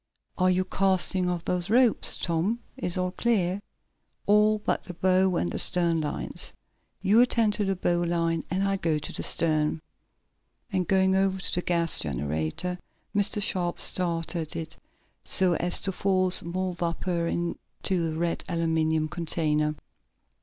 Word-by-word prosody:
Are 185 -1 +2
you 185 0 +1
casting 185 -1 +2
off 175 -1 -3
those 180 +1 -1
ropes, 240 0 +3
Tom? 175 +7 -1 0.2
Is 180 -9 0
all 180 0 -1
clear?" 195 -2 0 0.6
"All 210 +1 +4
but 210 - -2
the 180 - -8
bow 185 +1 +2
and 85 - 0
stern 170 -3 +2
lines." 150 - -5 0.5
"You 205 +5 +5
attend 230 -3 +2
to 210 - -1
the 195 0 0
bow 175 -1 0
line, 165 -1 0
and 190 +2 0
I'll 195 0 -1
go 160 -4 0
to 150 - -6
the - - -4
stern," 155 -1 +1 0.9
and, 185 -3 0
going 190 0 +3
over 190 0 +1
to - - -2
the 180 - 0
gas 170 -2 +1
generator, 80 - -3 0.4
Mr. 205 0 +3
Sharp 175 -3 -1
started 170 -2 -1
it 160 0 -6 0.5
so 185 -2 +4
as 175 +1 +3
to 195 - -1
force 185 -1 +2
more 185 +2 -3
vapor 170 0 -2
into 170 0 -3
the 160 - -5
red 170 0 -1
aluminum 160 -2 0
container. 155 -1 -1
180 Hz, 150 wpm, -26 LUFS, 165-190 Hz, 0.9 s, You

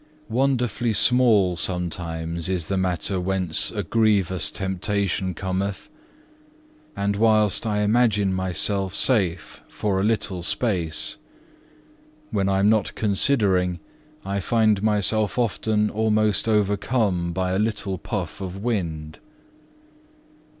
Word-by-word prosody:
Wonderfully 125 -2 0
small 110 -7 +3
sometimes 85 -2 -2
is 90 -4 -2
the 100 - 0
matter 95 0 0
whence 95 +1 +1
a 105 -2 -4
grievous 100 -2 +1
temptation 95 -1 -2
cometh, 95 - -4 1.1
and 100 0 -1
whilst 110 0 +2
I 105 -1 0
imagine 105 -3 +2
myself 95 +1 0
safe 95 - +1
for 100 -2 -2
a - - -1
little 105 -4 -1
space; 85 -5 -1 1.1
when 100 -3 0
I 95 - +1
am 100 - +3
not 110 -1 +1
considering, 95 -5 +2 0.5
I 100 +1 -2
find 110 0 +2
myself 105 +1 +1
often 110 -2 0
almost 110 -1 +1
overcome 105 -3 0
by 90 +1 -2
a 95 - 0
little 105 -4 -2
puff 95 -5 -5
of 95 0 -6
wind. 85 -8 -4
100 Hz, 110 wpm, -23 LUFS, 90-110 Hz, 1.1 s, small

